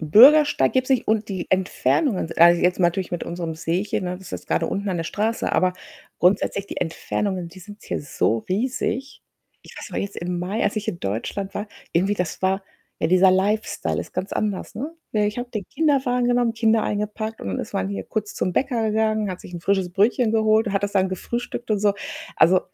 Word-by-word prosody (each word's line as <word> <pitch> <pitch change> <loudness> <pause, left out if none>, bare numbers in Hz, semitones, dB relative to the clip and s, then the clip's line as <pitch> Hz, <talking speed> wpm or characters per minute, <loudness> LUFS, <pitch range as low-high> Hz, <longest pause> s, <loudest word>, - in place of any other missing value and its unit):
'N 155 -2 -6
Bürgersteig 290 - +7
gibt's 255 0 +1
nicht 260 -3 +2
und 220 0 +1
die 190 -3 -4
Entfernungen 190 - +1
s - - -7
also 170 +1 +7
jetzt 180 0 +2
natürlich 180 +1 +1
mit 175 - -3
unserem 170 -2 -4
Seechen, 175 +5 -1
ne? 180 - -2
Das 190 0 -13
ist - - -10
jetzt - - -6
grade - - +1
unten 200 +1 -2
an 185 - -1
der 165 - -2
Straße, 220 +6 -1
aber 185 0 +3 0.5
grundsätzlich 195 +2 +2
die - - -7
Entfernungen, 180 +2 -2
die 185 +2 -13
sind 205 +3 -12
hier - - -3
so 125 -5 0
riesig. 255 +6 -2 0.4
Ich - - -14
weiß - - -8
noch - - -3
jetzt 200 0 -4
im 175 0 -3
Mai 190 +6 -2
als 205 - 0
ich 215 0 -3
in 185 -6 -2
Deutschland 145 - -3
war, 205 +1 -4 0.2
irgendwie 190 +5 +2
das 180 -5 -3
war, 190 +1 +1 0.4
ja, - - +1
dieser 185 +2 +6
Lifestyle 205 +4 0
ist - - -9
ganz 185 +2 -3
anders, 205 -3 -2
ne? 290 +8 -5 0.2
Ja, 210 -1 +2
ich 210 +2 -2
habe 245 0 -5
den 215 -5 -4
Kinderwagen 265 -5 +1
genommen, 245 -1 +2
Kinder 225 -1 +3
eingepackt 210 +2 -3
und - - -5
dann 95 - -2
ist - - -6
man 95 - 0
hier 100 -1 -4
kurz 210 -1 -4
zum 185 - -1
Bäcker 235 -2 0
gegangen, 215 -1 +1
hat 180 - -6
sich - - -12
'n 175 - -6
frisches 190 0 +1
Brötchen 215 +5 +2
geholt 220 0 +3
und - - -3
hat 195 - 0
das 200 0 -1
dann 190 -1 +2
gefrühstückt 235 +5 -4
und 210 - +2
so. 205 0 +3 0.4
Also, 180 +2 +5
200 Hz, 220 wpm, -23 LUFS, 180-220 Hz, 0.5 s, Bürgersteig